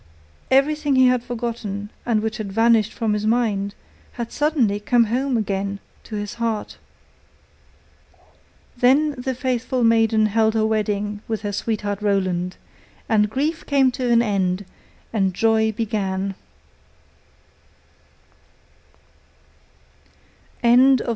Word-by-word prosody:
Everything 290 +1 +2
he 260 0 +5
had 250 -1 +3
forgotten, 225 -4 -5 0.2
and 220 -3 +1
which 220 -1 -2
had 210 -3 -5
vanished 225 0 +3
from 220 -2 -1
his 210 0 -1
mind, 210 -4 0 0.4
had 235 -1 -5
suddenly 280 -9 +1
come 235 +3 +3
home 250 +3 0
again 200 -1 -2 0.3
to 220 - -7
his 205 -1 -4
heart. 225 -2 -3 2.0
Then 270 +5 +3
the 260 -1 -4
faithful 250 0 -1
maiden 225 -1 +3
held 220 +1 +2
her 220 -1 +2
wedding 210 -1 -1
with 220 -1 -3
her 205 - -2
sweetheart 205 -1 -3
Roland, 185 -3 -1 0.5
and 210 -2 +2
grief 295 +8 -2
came 270 -3 +3
to 250 0 -3
an 235 0 +5
end 195 -3 -1 0.5
and 195 -4 0
joy 220 0 +2
began. 200 -3 -2
220 Hz, 110 wpm, -22 LUFS, 205-245 Hz, 2.0 s, he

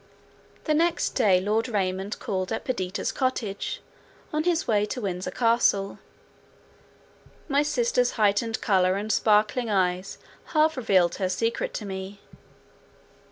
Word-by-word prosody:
The 310 - +1
next 335 +2 +2
day 200 -8 +3
Lord 215 +4 0
Raymond 190 -1 -2
called 185 0 -3
at 225 - -3
Perdita's 190 -7 -2
cottage, 240 -7 -2 0.5
on 305 +1 0
his 345 -2 +1
way 210 -3 +2
to 250 - -4
Windsor 185 -3 -3
Castle. 230 -3 +1 1.5
My 285 -1 +2
sister's 250 -3 +1
heightened 220 +1 +1
colour 185 -2 +2
and 210 +2 -2
sparkling 215 +3 +2
eyes 185 -2 0 0.4
half 310 +1 +4
revealed 190 -9 +2
her 185 -2 -1
secret 230 +5 -1
to 210 - -4
me. 190 +1 -6
210 Hz, 125 wpm, -26 LUFS, 190-245 Hz, 1.5 s, half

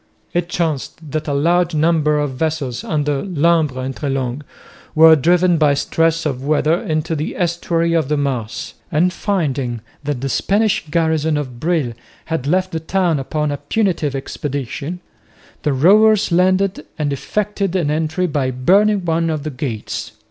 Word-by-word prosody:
It 175 0 -1
chanced 160 -2 -3
that 155 0 -3
a 145 - 0
large 170 +3 +2
number 155 -1 +2
of 145 -2 -1
vessels 135 -3 -2
under 145 -2 -1
Lumbres 160 -7 +1
and 135 0 -4
Treslong 135 -2 -2 0.5
were 160 0 +8
driven 175 +3 +3
by 145 -2 +4
stress 165 +3 +1
of 135 -3 -2
weather 155 +2 +2
into 155 +1 -1
the 150 0 -3
estuary 170 -1 0
of 160 -4 +1
the 150 - +1
Maas; 130 -5 -3 0.2
and 175 +3 +2
finding 140 - -1 0.2
that 145 -3 -2
the 135 - -1
Spanish 205 - +1
garrison 160 -1 +1
of 130 -5 -5
Brill 155 -6 0 0.3
had 160 -5 -3
left 185 +4 +1
the 160 - -2
town 170 -1 0
upon 150 +2 -2
a 145 - -2
punitive 155 -2 -1
expedition, 140 +4 -4 0.6
the 150 - 0
rovers 205 +9 +4
landed 185 +2 +2
and 145 -3 -1
effected 200 +6 -2
an 165 -6 +1
entry 160 +3 0
by 145 -6 0
burning 190 +10 +3
one 165 0 +1
of 155 -3 -2
the 155 - -4
gates. 125 -7 -5
155 Hz, 155 wpm, -19 LUFS, 140-175 Hz, 0.6 s, were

